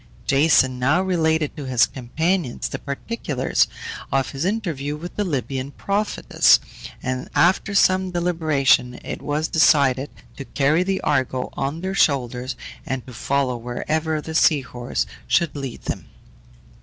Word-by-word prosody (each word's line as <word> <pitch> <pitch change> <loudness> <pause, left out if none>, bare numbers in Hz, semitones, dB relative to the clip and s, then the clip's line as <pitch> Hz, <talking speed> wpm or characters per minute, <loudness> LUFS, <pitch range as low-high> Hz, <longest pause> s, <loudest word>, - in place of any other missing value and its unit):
Jason 135 -3 +3
now 140 +7 +3
related 160 -5 +1
to 145 -4 -6
his 125 -3 +4
companions 160 +3 -2
the - - -5
particulars 140 - -1 0.4
of 135 -1 0
his 140 +4 -3
interview 165 -9 -2
with 175 +3 -8
the 210 - 0
Libyan 135 -5 -3
prophetess, 200 +8 +2 0.4
and 130 0 -3
after 190 +3 +3
some 185 -1 +4
deliberation 155 -8 +1
it - - -5
was 150 +3 -1
decided 140 -4 +3 0.3
to - - -6
carry 145 +5 +1
the 190 +1 -1
Argo 130 -3 0
on 140 +4 -3
their 190 +1 -3
shoulders, 130 -7 +1 0.3
and 130 -2 -4
to 125 - -11
follow 135 +1 0
wherever 155 +7 -2
the 160 - -7
sea 155 -2 +4
horse 120 - -3 0.2
should 170 -3 +2
lead 135 -4 -6
them. - - -4
145 Hz, 140 wpm, -22 LUFS, 130-170 Hz, 0.4 s, his